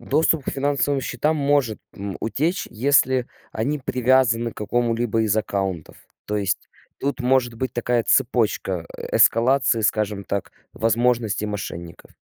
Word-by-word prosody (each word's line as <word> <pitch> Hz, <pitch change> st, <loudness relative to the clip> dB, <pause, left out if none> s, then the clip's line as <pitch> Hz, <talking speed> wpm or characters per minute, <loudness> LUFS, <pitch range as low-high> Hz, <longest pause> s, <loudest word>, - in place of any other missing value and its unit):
Доступ 150 Hz, +4 st, +1 dB
к -, -, -2 dB
финансовым 140 Hz, 0 st, 0 dB
счетам 150 Hz, +5 st, -1 dB
может, 140 Hz, -6 st, +1 dB, 0.2 s
м, 100 Hz, -1 st, -5 dB
утечь, 155 Hz, -, -1 dB
если 130 Hz, +1 st, +2 dB, 0.3 s
они 140 Hz, +7 st, -1 dB
привязаны 125 Hz, -2 st, +2 dB
к -, -, -19 dB
какому-либо 115 Hz, 0 st, 0 dB
из 110 Hz, -1 st, +1 dB
аккаунтов, 95 Hz, -5 st, -2 dB, 0.3 s
то 105 Hz, -, -2 dB
есть 100 Hz, -2 st, -2 dB, 0.3 s
тут 140 Hz, -1 st, -2 dB
может 125 Hz, -2 st, +2 dB
быть 125 Hz, +1 st, -3 dB
такая 120 Hz, 0 st, 0 dB
цепочка, 105 Hz, -8 st, +1 dB
э, -, -, -3 dB
эскалации, 120 Hz, 0 st, +4 dB
скажем 105 Hz, -1 st, 0 dB
так, 100 Hz, -1 st, -3 dB, 0.2 s
возможностей 115 Hz, -2 st, +1 dB
мошенников. 85 Hz, -5 st, -7 dB
120 Hz, 130 wpm, -22 LUFS, 105-130 Hz, 0.3 s, эскалации